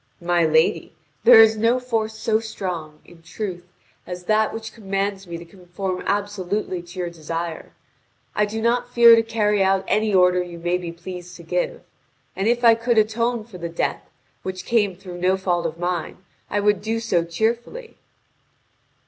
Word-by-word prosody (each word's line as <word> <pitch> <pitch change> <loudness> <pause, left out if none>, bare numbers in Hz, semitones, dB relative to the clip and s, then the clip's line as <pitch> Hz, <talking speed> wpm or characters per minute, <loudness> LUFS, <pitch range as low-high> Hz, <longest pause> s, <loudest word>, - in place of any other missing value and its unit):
"My 175 0 +1
lady, 160 +1 +2 0.3
there 225 -1 +10
is 220 0 +4
no 230 +3 +2
force 225 -3 -2
so 220 0 +1
strong, 175 -8 -6
in 170 -1 -17
truth, 175 +1 -6 0.4
as 180 0 -6
that 215 +3 +2
which 220 -1 -7
commands 195 -2 -3
me 170 -1 -5
to 170 - -10
conform 185 +1 -5
absolutely 200 -2 -2
to 175 +2 -14
your 175 -1 -3
desire. 165 0 -5 0.6
I 210 0 +1
do 220 +1 -4
not 245 +1 +1
fear 235 -1 +8
to 225 - +4
carry 210 -2 +1
out 190 0 +2
any 215 0 +1
order 180 -1 +4
you 175 -1 -7
may 175 +2 -1
be 175 -2 -6
pleased 175 +1 -9
to - - -12
give. - - -2 0.5
And 195 +2 -1
if 240 +1 +1
I 230 -1 +8
could 230 +1 0
atone 230 +2 +1
for 210 -5 -12
the 170 0 -4
death, 165 - -2 0.4
which 185 -1 -6
came 210 -5 +1
through 180 -1 -9
no 185 +1 +2
fault 175 -3 0
of 165 0 -7
mine, 175 -1 -3 0.3
I 205 - 0
would 205 -1 +2
do 225 +2 -1
so 195 -7 +1
cheerfully." 235 - -3
195 Hz, 175 wpm, -22 LUFS, 175-225 Hz, 0.6 s, there